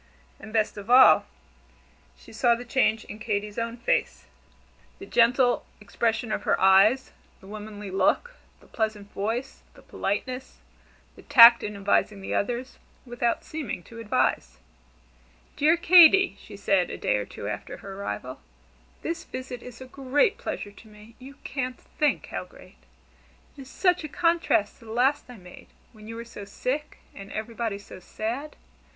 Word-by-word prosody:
And 220 Hz, -, -11 dB
best 215 Hz, -1 st, 0 dB
of 205 Hz, +2 st, -9 dB
all, 255 Hz, +1 st, +7 dB, 0.9 s
she -, -, -16 dB
saw 240 Hz, -2 st, +3 dB
the 245 Hz, +1 st, -9 dB
change 225 Hz, -3 st, +1 dB
in 210 Hz, -, -10 dB
Katy's 210 Hz, -1 st, -3 dB
own 230 Hz, +1 st, -4 dB
face: 240 Hz, -, -1 dB, 0.7 s
the 390 Hz, -, -10 dB
gentle 245 Hz, -2 st, +3 dB, 0.2 s
expression 225 Hz, +2 st, -2 dB
of -, -, -2 dB
her -, -, 0 dB
eyes, 195 Hz, +7 st, +4 dB, 0.3 s
the -, -, -17 dB
womanly 210 Hz, -1 st, -8 dB
look, 480 Hz, -, +1 dB, 0.3 s
the -, -, -20 dB
pleasant 215 Hz, -2 st, -4 dB
voice, 230 Hz, +7 st, -4 dB
the -, -, -17 dB
politeness, 255 Hz, +6 st, -4 dB, 0.6 s
the -, -, -14 dB
tact 235 Hz, -4 st, +8 dB
in 210 Hz, 0 st, -5 dB
advising 200 Hz, +1 st, 0 dB
the 190 Hz, -, -5 dB
others, 245 Hz, +5 st, -3 dB, 0.3 s
without 240 Hz, -1 st, -1 dB
seeming 300 Hz, -, -6 dB
to 230 Hz, +5 st, -12 dB
advise. 65 Hz, -, -1 dB, 1.0 s
"Dear 315 Hz, +4 st, +3 dB
Katy," 360 Hz, +2 st, +7 dB
she 205 Hz, -2 st, -12 dB
said 195 Hz, -3 st, +1 dB
a -, -, -6 dB
day -, -, 0 dB
or 105 Hz, -, -3 dB
two 100 Hz, -, -8 dB
after 105 Hz, 0 st, -6 dB
her 195 Hz, -, -10 dB
arrival, 130 Hz, -, -6 dB, 0.6 s
"this 330 Hz, 0 st, -4 dB
visit 255 Hz, -1 st, -7 dB
is 250 Hz, -1 st, -12 dB
a -, -, -7 dB
great 275 Hz, -, +1 dB
pleasure 205 Hz, -, -5 dB
to 205 Hz, +2 st, -17 dB
me 215 Hz, +2 st, -16 dB
you 270 Hz, +2 st, -12 dB
can't 255 Hz, -2 st, -4 dB
think 300 Hz, -1 st, -1 dB
how -, -, -4 dB
great. -, -, -17 dB, 0.8 s
It 285 Hz, -, -11 dB
is 260 Hz, -, -12 dB
such 360 Hz, 0 st, +1 dB
a 305 Hz, -, -6 dB
contrast 335 Hz, -11 st, +1 dB
to 230 Hz, -, -17 dB
the 220 Hz, -, -10 dB
last 270 Hz, +5 st, +1 dB
I 245 Hz, -, -11 dB
made, 180 Hz, -2 st, -14 dB, 0.3 s
when 215 Hz, -1 st, -14 dB
you 225 Hz, -, -7 dB
were 230 Hz, 0 st, -7 dB
so 230 Hz, -3 st, -10 dB
sick, 260 Hz, +9 st, -4 dB, 0.2 s
and 195 Hz, 0 st, -11 dB
everybody 225 Hz, -1 st, -4 dB
so 200 Hz, -2 st, -12 dB
sad. 240 Hz, +10 st, -5 dB
230 Hz, 165 wpm, -26 LUFS, 205-260 Hz, 1.0 s, tact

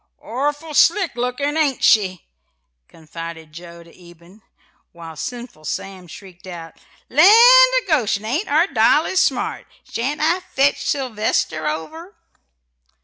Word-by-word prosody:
"Orful 290 Hz, +5 st, -4 dB
slick 345 Hz, +1 st, +2 dB
lookin', 250 Hz, +4 st, -3 dB
ain't 295 Hz, -5 st, -1 dB
she?" 190 Hz, -4 st, +2 dB, 0.6 s
confided 165 Hz, 0 st, -11 dB
Joe 170 Hz, 0 st, -12 dB
to 170 Hz, -, -20 dB
Eben; 175 Hz, +3 st, -19 dB, 0.5 s
while 165 Hz, -1 st, -11 dB
sinful 240 Hz, -, -8 dB
Sam 190 Hz, +2 st, -6 dB
shrieked 185 Hz, +1 st, -14 dB
out: 165 Hz, -2 st, -10 dB, 0.3 s
"Land 305 Hz, +8 st, +5 dB
o' -, -, +6 dB
Goshen! 215 Hz, -, 0 dB
ain't 290 Hz, -, -2 dB
our 310 Hz, +4 st, +2 dB
Dolly 375 Hz, -, +1 dB
smart? -, -, -1 dB, 0.2 s
Shan't 275 Hz, +6 st, -4 dB
I 330 Hz, +4 st, +1 dB
fetch 285 Hz, -5 st, -1 dB
Sylvester 215 Hz, -, -2 dB
over?" 320 Hz, -, -6 dB
240 Hz, 120 wpm, -19 LUFS, -, 0.6 s, o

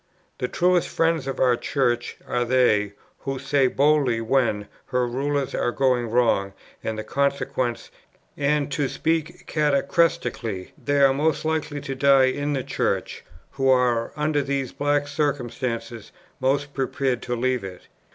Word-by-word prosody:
The 125 Hz, -, -1 dB
truest 180 Hz, +4 st, +2 dB
friends 165 Hz, -4 st, +1 dB
of 135 Hz, -, -4 dB
our 125 Hz, -2 st, +4 dB
Church 120 Hz, -2 st, -1 dB
are 120 Hz, -, 0 dB
they, 115 Hz, -5 st, +2 dB, 0.3 s
who 135 Hz, -1 st, -4 dB
say 135 Hz, 0 st, +2 dB
boldly 140 Hz, -3 st, +2 dB
when 115 Hz, -3 st, +1 dB, 0.2 s
her 125 Hz, -1 st, +1 dB
rulers 135 Hz, +3 st, -1 dB
are 120 Hz, -, 0 dB
going 125 Hz, -3 st, +1 dB
wrong, 110 Hz, -5 st, +2 dB, 0.3 s
and 110 Hz, -1 st, -3 dB
the 110 Hz, -, -4 dB
consequences; 135 Hz, -1 st, -1 dB, 0.4 s
and 145 Hz, 0 st, 0 dB
(to 140 Hz, 0 st, 0 dB
speak 160 Hz, -1 st, -2 dB
catachrestically) 140 Hz, -, 0 dB
they 145 Hz, 0 st, +2 dB
are 135 Hz, -1 st, +6 dB
most 155 Hz, +3 st, 0 dB
likely 155 Hz, -2 st, -2 dB
to 135 Hz, -, -4 dB
die 135 Hz, -1 st, +5 dB
in 145 Hz, +2 st, -2 dB
the 135 Hz, -2 st, -1 dB
Church, -, -, -2 dB, 0.3 s
who 135 Hz, -1 st, 0 dB
are, 125 Hz, -3 st, +2 dB
under 150 Hz, -1 st, +1 dB
these 135 Hz, -2 st, -2 dB
black 145 Hz, 0 st, 0 dB
circumstances, 125 Hz, -6 st, -3 dB, 0.3 s
most 140 Hz, +2 st, 0 dB
prepared 130 Hz, -2 st, -1 dB
to 120 Hz, -, -3 dB
leave 125 Hz, 0 st, 0 dB
it. 95 Hz, -2 st, -8 dB
135 Hz, 145 wpm, -24 LUFS, 120-145 Hz, 0.4 s, are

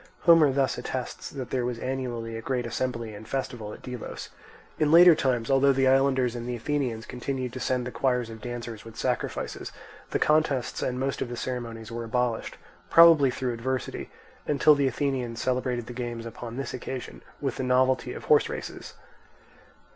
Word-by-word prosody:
Homer 165 Hz, -4 st, +6 dB
thus 135 Hz, -2 st, +1 dB
attests 125 Hz, 0 st, -5 dB
that 135 Hz, -3 st, -7 dB
there 130 Hz, -2 st, 0 dB
was 120 Hz, -1 st, -2 dB
anciently 120 Hz, -3 st, -3 dB
a 115 Hz, -, -5 dB
great 125 Hz, 0 st, -2 dB
assembly 115 Hz, -2 st, -3 dB
and 105 Hz, +1 st, -10 dB
festival 125 Hz, -5 st, -3 dB
at -, -, -11 dB
Delos. 125 Hz, -2 st, -7 dB, 0.5 s
In 150 Hz, -1 st, +3 dB
later 175 Hz, +1 st, +9 dB
times, 125 Hz, -5 st, 0 dB
although 135 Hz, +1 st, +5 dB
the 135 Hz, 0 st, +2 dB
islanders 130 Hz, -2 st, +3 dB
and 120 Hz, 0 st, -5 dB
the 125 Hz, -, -2 dB
Athenians 120 Hz, -3 st, -2 dB
continued 125 Hz, 0 st, -4 dB
to 130 Hz, -, -5 dB
send 125 Hz, 0 st, 0 dB
the 125 Hz, -, -4 dB
choirs 125 Hz, -4 st, 0 dB
of 110 Hz, -1 st, -10 dB
dancers 120 Hz, -2 st, -6 dB
with 115 Hz, 0 st, -12 dB
sacrifices, 125 Hz, +1 st, -3 dB, 0.4 s
the -, -, 0 dB
contests 150 Hz, -5 st, +1 dB
and 125 Hz, 0 st, -1 dB
most 135 Hz, +1 st, -2 dB
of 120 Hz, -, -2 dB
the 120 Hz, -, -5 dB
ceremonies 115 Hz, -3 st, -5 dB
were 115 Hz, 0 st, -4 dB
abolished, 120 Hz, 0 st, -1 dB, 0.3 s
probably 165 Hz, -5 st, +8 dB
through 125 Hz, -1 st, -2 dB
adversity, 130 Hz, +3 st, -3 dB, 0.4 s
until 150 Hz, +1 st, +5 dB
the 140 Hz, -2 st, +2 dB
Athenians 130 Hz, -4 st, -2 dB
celebrated 125 Hz, -2 st, -1 dB
the 125 Hz, -, -8 dB
games 120 Hz, -1 st, -5 dB
upon 115 Hz, +1 st, -7 dB
this 135 Hz, -, -4 dB
occasion 130 Hz, 0 st, -6 dB, 0.2 s
with 135 Hz, -2 st, -2 dB
the -, -, -2 dB
novelty 130 Hz, +1 st, +2 dB
of -, -, -7 dB
horse -, -, +4 dB
races. -, -, -7 dB
125 Hz, 175 wpm, -27 LUFS, 120-135 Hz, 0.5 s, later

